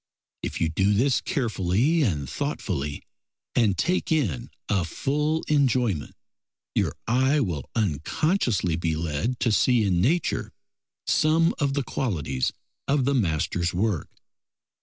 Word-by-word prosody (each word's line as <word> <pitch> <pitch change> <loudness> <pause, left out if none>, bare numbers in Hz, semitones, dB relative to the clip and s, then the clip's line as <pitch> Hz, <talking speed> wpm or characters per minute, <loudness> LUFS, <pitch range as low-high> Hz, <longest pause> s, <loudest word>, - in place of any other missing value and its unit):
If - - -4
you 80 - +2
do 95 +6 +2
this 130 +5 +2
carefully 120 - +1
and 75 - 0
thoughtfully, 70 +3 -3 0.5
and 105 -6 +2
take 180 0 0
in 115 - 0 0.2
a 95 -4 +1
full 150 - -1
enjoyment, 125 - +1 0.6
your - - +1
eye 130 +5 +3
will 85 - -2
unconsciously 110 - 0
be 85 -1 -1
led 85 - -2
to 115 - +2
see 120 +1 +3
in 90 -4 +2
nature 165 - 0 0.5
some 165 +2 +3
of 140 -1 +1
the 140 - 0
qualities 80 - -1 0.4
of 135 -2 +2
the 140 - +2
master's 85 - 0
work. 100 -4 0
110 Hz, 125 wpm, -25 LUFS, 85-140 Hz, 0.6 s, eye